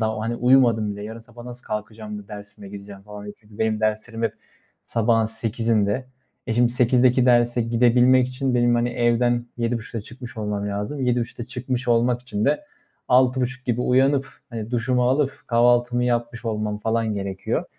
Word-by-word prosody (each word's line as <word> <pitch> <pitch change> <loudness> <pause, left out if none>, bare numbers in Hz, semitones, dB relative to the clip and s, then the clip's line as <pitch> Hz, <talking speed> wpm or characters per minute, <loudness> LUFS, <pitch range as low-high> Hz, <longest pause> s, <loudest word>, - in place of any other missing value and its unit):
daha, 110 -1 -1
hani, 115 +2 -2
"Uyumadım 120 -4 +3
bile 105 - -8
yarın 110 +2 -7
sabah 120 +1 -14
nasıl 125 0 -9
kalkacağım 105 0 -6
da 100 - -13
dersime 100 -1 -10
gideceğim?" 100 0 -10
falan 105 0 -10
diye. 105 - -8
Çünkü 105 0 -18
benim 110 -1 0
derslerim 110 +1 -2
hep 115 - 0 0.5
sabahın 115 -1 +2
8.00'inde. 115 0 -1 0.4
E, 115 - -1
şimdi 120 0 +4
8.00'deki 125 +1 +3
derse 120 -1 +3
gidebilmek 125 +2 +4
için 130 0 -2
benim, 120 0 +3
hani, 120 0 +1
evden 120 0 +1
7.30'da 115 -1 -3
çıkmış 120 +3 -11
olmam 105 -1 -3
lazım. 105 +8 -4
7.30'da 120 -1 -1
çıkmış 125 -1 -4
olmak 120 +1 +2
için 110 -4 -3
de 150 - +1 0.4
6.30 130 +1 +2
gibi 120 -1 0
uyanıp, 135 +2 +3 0.2
hani, 115 -1 -6
duşumu 125 +1 +1
alıp 135 +1 0
kahvaltımı 120 +1 +3
yapmış 120 0 -1
olmam 105 -2 -2
falan 110 0 -1
gerekiyor. 95 -1 -3
120 Hz, 160 wpm, -23 LUFS, 110-125 Hz, 0.5 s, şimdi